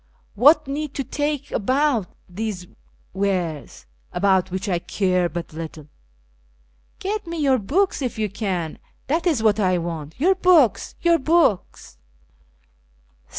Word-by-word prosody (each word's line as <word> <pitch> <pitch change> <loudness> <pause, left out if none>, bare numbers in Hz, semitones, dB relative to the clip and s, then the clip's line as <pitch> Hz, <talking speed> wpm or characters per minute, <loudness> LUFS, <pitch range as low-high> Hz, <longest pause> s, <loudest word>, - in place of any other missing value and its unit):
What 295 +7 +5
need 290 +1 -4
to 275 - -2
talk 290 +1 -3
about 260 -2 +1 0.2
these 195 -1 -5 0.5
wares, 180 - -2 0.3
about 190 -2 +2
which 190 +3 -4
I 180 -3 0
care 180 -1 0
but 170 -2 -6
little? 155 -2 -8 1.1
(Jet 415 0 -4
nic 335 -1 -4
your 270 -3 +3
books 330 - 0
if 250 -3 -3
you 215 -1 0
can; 190 -5 -3 0.3
that 325 +5 0
is 285 -10 +1
what 215 -1 +3
I 185 -3 +2
want 165 -3 -5
— - - -28
your 365 +7 +4
books, 360 - +3
your 340 -1 +4
books 305 - 0
220 Hz, 135 wpm, -22 LUFS, 180-300 Hz, 1.1 s, What